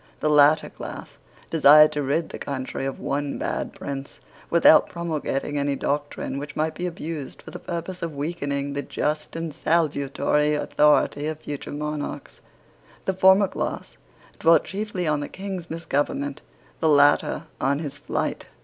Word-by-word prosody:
The 155 Hz, -, +1 dB
latter 150 Hz, +1 st, +5 dB
class -, -, -9 dB, 0.3 s
desired 150 Hz, -1 st, +7 dB
to 150 Hz, -, -2 dB
rid 145 Hz, +4 st, 0 dB
the -, -, -8 dB
country 135 Hz, -1 st, -4 dB
of 135 Hz, -, -5 dB
one 140 Hz, +1 st, -2 dB
bad -, -, -3 dB
prince, 140 Hz, 0 st, -7 dB, 0.3 s
without 165 Hz, -2 st, +6 dB
promulgating 150 Hz, -4 st, -2 dB
any 140 Hz, 0 st, 0 dB
doctrine 145 Hz, -1 st, -2 dB
which 150 Hz, +1 st, -7 dB
might 155 Hz, +1 st, 0 dB
be 180 Hz, +3 st, -3 dB
abused 165 Hz, -4 st, -6 dB
for -, -, -10 dB
the -, -, -7 dB
purpose 175 Hz, +1 st, -5 dB
of 165 Hz, -3 st, -4 dB
weakening 140 Hz, -2 st, -3 dB
the 140 Hz, -, -2 dB
just 150 Hz, +2 st, -3 dB
and 165 Hz, -2 st, -4 dB
salutary 150 Hz, -1 st, +1 dB
authority 150 Hz, 0 st, +2 dB
of 155 Hz, -1 st, -4 dB
future 145 Hz, -1 st, -6 dB
monarchs. 150 Hz, 0 st, -5 dB, 0.6 s
The 190 Hz, -, +1 dB
former 190 Hz, +2 st, +5 dB
class -, -, -4 dB, 0.4 s
dwelt 165 Hz, 0 st, +5 dB
chiefly 195 Hz, -2 st, -4 dB
on 150 Hz, -1 st, +1 dB
the 145 Hz, -, -5 dB
King's 190 Hz, -3 st, -6 dB
misgovernment; 165 Hz, -, -2 dB, 0.4 s
the 160 Hz, -, +2 dB
latter 145 Hz, -1 st, +4 dB, 0.2 s
on 140 Hz, +1 st, +2 dB
his 145 Hz, -2 st, -6 dB
flight. -, -, -3 dB
150 Hz, 150 wpm, -24 LUFS, 145-165 Hz, 0.6 s, desired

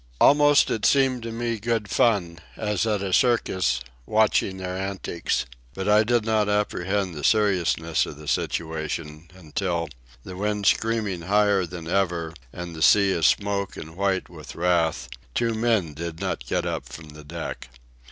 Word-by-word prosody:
Almost 145 Hz, 0 st, +5 dB
it 110 Hz, -, -2 dB
seemed 130 Hz, -1 st, +3 dB
to 115 Hz, 0 st, -5 dB
me 115 Hz, 0 st, -2 dB
good 115 Hz, -1 st, -1 dB
fun, 95 Hz, -6 st, +1 dB, 0.2 s
as 105 Hz, 0 st, -1 dB
at 105 Hz, -2 st, 0 dB
a 95 Hz, -2 st, -2 dB
circus, 95 Hz, -, +2 dB, 0.3 s
watching 105 Hz, -3 st, +2 dB
their 90 Hz, -1 st, -4 dB
antics. 95 Hz, -2 st, -2 dB, 0.3 s
But 95 Hz, +1 st, -4 dB
I 105 Hz, +1 st, +5 dB
did 120 Hz, 0 st, +1 dB
not 110 Hz, -2 st, +1 dB
apprehend 100 Hz, -2 st, 0 dB
the 75 Hz, -2 st, -7 dB
seriousness 90 Hz, -6 st, +2 dB
of -, -, -8 dB
the 75 Hz, 0 st, -11 dB
situation 80 Hz, 0 st, -3 dB
until, 85 Hz, -1 st, -3 dB, 0.3 s
the 90 Hz, -, -8 dB
wind 105 Hz, +1 st, -2 dB
screaming 110 Hz, -6 st, +1 dB
higher 100 Hz, 0 st, +2 dB
than 85 Hz, -1 st, -8 dB
ever 85 Hz, -3 st, 0 dB, 0.2 s
and 85 Hz, +2 st, -7 dB
the 80 Hz, -, -8 dB
sea 100 Hz, +3 st, +5 dB
a 85 Hz, -, -1 dB
smoke 100 Hz, +2 st, +1 dB
and 80 Hz, +1 st, -9 dB
white 95 Hz, 0 st, 0 dB
with 80 Hz, -4 st, -11 dB
wrath, 85 Hz, -6 st, +1 dB, 0.3 s
two 115 Hz, -1 st, +1 dB
men 110 Hz, -8 st, +1 dB
did 85 Hz, +2 st, -6 dB
not 95 Hz, -1 st, -3 dB
get -, -, -1 dB
up -, -, -3 dB
from 80 Hz, -1 st, -10 dB
the 75 Hz, 0 st, -12 dB
deck. 80 Hz, -1 st, -7 dB
95 Hz, 160 wpm, -24 LUFS, 85-105 Hz, 0.3 s, Almost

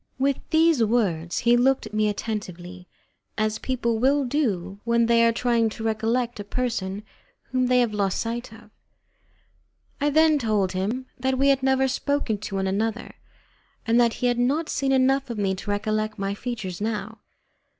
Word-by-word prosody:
With 275 Hz, +1 st, +1 dB
these 320 Hz, -5 st, +4 dB
words 190 Hz, -8 st, 0 dB
he 240 Hz, 0 st, +4 dB
looked 260 Hz, +1 st, +2 dB
at 215 Hz, -, -10 dB
me 215 Hz, 0 st, +2 dB
attentively, 185 Hz, -4 st, -6 dB, 0.5 s
as 215 Hz, 0 st, 0 dB
people 235 Hz, -3 st, -1 dB
will 275 Hz, +3 st, +2 dB
do 200 Hz, -, -1 dB
when 235 Hz, 0 st, +2 dB
they 230 Hz, 0 st, +4 dB
are 230 Hz, -, +5 dB
trying 230 Hz, -1 st, +1 dB
to 220 Hz, +1 st, -8 dB
recollect 225 Hz, +2 st, -1 dB
a -, -, -4 dB
person 205 Hz, -3 st, -3 dB, 0.5 s
whom 255 Hz, -1 st, +1 dB
they 250 Hz, 0 st, +4 dB
have 235 Hz, -3 st, 0 dB
lost 200 Hz, -2 st, 0 dB
sight 235 Hz, +1 st, -4 dB
of. 220 Hz, -1 st, -15 dB, 1.3 s
I 290 Hz, -, +3 dB
then 310 Hz, 0 st, +4 dB
told 210 Hz, -6 st, 0 dB
him 205 Hz, +8 st, -2 dB
that 260 Hz, +1 st, 0 dB
we 275 Hz, +1 st, +3 dB
had 275 Hz, -1 st, +3 dB
never 265 Hz, 0 st, +2 dB
spoken 265 Hz, -5 st, -1 dB
to 200 Hz, -1 st, -6 dB
one 190 Hz, 0 st, -1 dB
another, 220 Hz, +4 st, -2 dB, 0.7 s
and 230 Hz, +1 st, +4 dB
that 235 Hz, -1 st, +3 dB
he -, -, -3 dB
had 245 Hz, -1 st, +1 dB
not 285 Hz, +7 st, +1 dB
seen 270 Hz, 0 st, 0 dB
enough 270 Hz, 0 st, +2 dB
of 235 Hz, -, -4 dB
me 195 Hz, -2 st, 0 dB
to 190 Hz, +2 st, -7 dB
recollect 215 Hz, +1 st, -1 dB
my 195 Hz, 0 st, -2 dB
features 205 Hz, -5 st, -5 dB
now. 220 Hz, 0 st, -3 dB
230 Hz, 175 wpm, -24 LUFS, 210-255 Hz, 1.3 s, are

